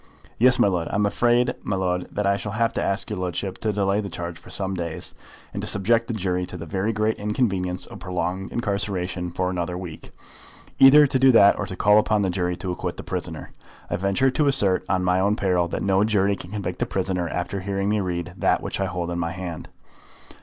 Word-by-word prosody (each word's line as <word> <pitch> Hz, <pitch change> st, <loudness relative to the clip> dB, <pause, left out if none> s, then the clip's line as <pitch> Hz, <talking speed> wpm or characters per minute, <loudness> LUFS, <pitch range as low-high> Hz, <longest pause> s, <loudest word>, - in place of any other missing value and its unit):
"Yes, 125 Hz, +1 st, +5 dB
my -, -, +4 dB
lud; 90 Hz, -4 st, -1 dB
and -, -, -7 dB
I -, -, 0 dB
am 105 Hz, +1 st, +2 dB
afraid, 120 Hz, +4 st, +2 dB
my 100 Hz, -, -2 dB
lud, 90 Hz, -1 st, -1 dB
that 105 Hz, -, -2 dB
I 100 Hz, 0 st, +3 dB
shall 105 Hz, 0 st, -5 dB
have 115 Hz, +1 st, +1 dB
to -, -, -1 dB
ask 100 Hz, +1 st, -1 dB
your 105 Hz, -, -3 dB
ludship 90 Hz, +1 st, -3 dB
to 110 Hz, -, 0 dB
delay 100 Hz, 0 st, +1 dB
your 100 Hz, -, -5 dB
charge 85 Hz, -1 st, -6 dB
for -, -, -15 dB
some 95 Hz, -1 st, -2 dB
days, 85 Hz, -3 st, -4 dB, 0.4 s
and -, -, -3 dB
to -, -, -4 dB
subject 115 Hz, +4 st, +2 dB
the 115 Hz, -, -3 dB
jury 90 Hz, -3 st, -1 dB
to -, -, -8 dB
the 85 Hz, -, -7 dB
very 95 Hz, +6 st, -1 dB
great 110 Hz, 0 st, 0 dB
inconvenience 95 Hz, -4 st, -1 dB
of -, -, -11 dB
prolonged 95 Hz, 0 st, -3 dB
incarceration 95 Hz, -5 st, -2 dB
for 90 Hz, +1 st, -2 dB
another 90 Hz, 0 st, -3 dB
week; 90 Hz, -4 st, -8 dB, 0.7 s
either 145 Hz, +3 st, +9 dB
to 130 Hz, -1 st, 0 dB
do 135 Hz, 0 st, +6 dB
that 100 Hz, -3 st, +6 dB
or 105 Hz, -, -2 dB
to 95 Hz, -, -5 dB
call 105 Hz, +3 st, +5 dB
upon 105 Hz, -1 st, +1 dB
the 95 Hz, -, 0 dB
jury 90 Hz, -1 st, -1 dB
to 90 Hz, +1 st, -4 dB
acquit 90 Hz, -, -4 dB
the -, -, -7 dB
prisoner. -, -, -5 dB, 0.4 s
I -, -, +1 dB
venture 100 Hz, +8 st, +1 dB
to 145 Hz, +2 st, +1 dB
assert, 100 Hz, -10 st, +3 dB
on 90 Hz, -1 st, +1 dB
my 90 Hz, 0 st, +2 dB
own 100 Hz, +2 st, +2 dB
peril, 90 Hz, -5 st, +1 dB
that -, -, -4 dB
no 95 Hz, 0 st, +3 dB
jury 100 Hz, -2 st, +2 dB
can 90 Hz, -, -10 dB
convict 100 Hz, -2 st, -4 dB
the -, -, 0 dB
prisoner 90 Hz, -3 st, -2 dB
after 90 Hz, +4 st, -3 dB
hearing 100 Hz, +1 st, -2 dB
me 105 Hz, +1 st, +1 dB
read 85 Hz, -2 st, -3 dB
that -, -, +1 dB
which -, -, -4 dB
I 95 Hz, -, +1 dB
hold 90 Hz, -1 st, -3 dB
in 85 Hz, -, -3 dB
my 85 Hz, 0 st, -2 dB
hand." 90 Hz, -3 st, -6 dB
95 Hz, 235 wpm, -24 LUFS, 90-105 Hz, 0.7 s, either